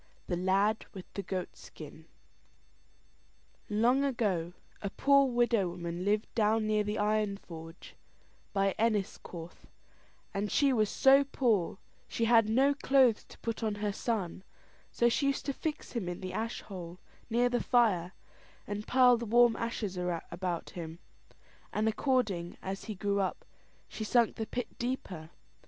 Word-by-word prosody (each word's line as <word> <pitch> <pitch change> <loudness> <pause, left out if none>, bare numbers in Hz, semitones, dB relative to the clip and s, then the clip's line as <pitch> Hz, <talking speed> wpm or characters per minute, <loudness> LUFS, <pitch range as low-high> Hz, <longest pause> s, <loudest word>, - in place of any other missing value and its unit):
THE 175 - -1
LAD 195 +4 +1
WITH 185 - -10
THE 200 - -3
GOAT 185 -1 -4
SKIN 155 +1 -12 1.6
Long 235 +6 +3
ago, 200 -11 0 0.3
a 200 - -2
poor 275 +5 +4
widow 240 -6 +2
woman 170 0 -5
lived 210 +2 +1
down 220 -1 +2
near 215 0 +2
the 210 +1 -2
iron 210 -1 +1
forge, 165 -2 -11 0.6
by 195 -1 +1
Enniscorth, 195 -6 -2 0.7
and 200 +1 -2
she 280 -2 +3
was 215 -4 +2
so 270 +1 +6
poor 230 -10 0 0.3
she 230 - -1
had 225 -2 +5
no 270 +5 +4
clothes 265 -5 +3
to - - -15
put 230 0 -3
on 215 -2 -1
her 205 0 -2
son; 195 -5 -2 0.5
so 235 - +2
she 275 +4 +2
used 275 - -1
to 280 - -1
fix 305 +2 -4
him 215 -8 -3
in 175 - -5
the 185 -1 -6
ash 225 +1 -3
hole, 180 -3 -8 0.3
near 240 +2 +3
the 245 0 0
fire, 200 -8 +2 0.5
and 205 +1 -5
pile 250 -1 +6
the 235 0 -5
warm 240 +1 +5
ashes 215 -5 -3 0.3
about 175 -1 -3
him; 165 -2 -7 0.7
and 215 +1 0
according 215 -7 0
as 195 +1 -5
he 215 - -5
grew 200 +1 0
up, 190 - -2 0.4
she 220 - -6
sunk 235 +1 +3
the 220 - -4
pit 245 -2 -5
deeper. 195 -10 -4
215 Hz, 150 wpm, -31 LUFS, 185-240 Hz, 1.6 s, so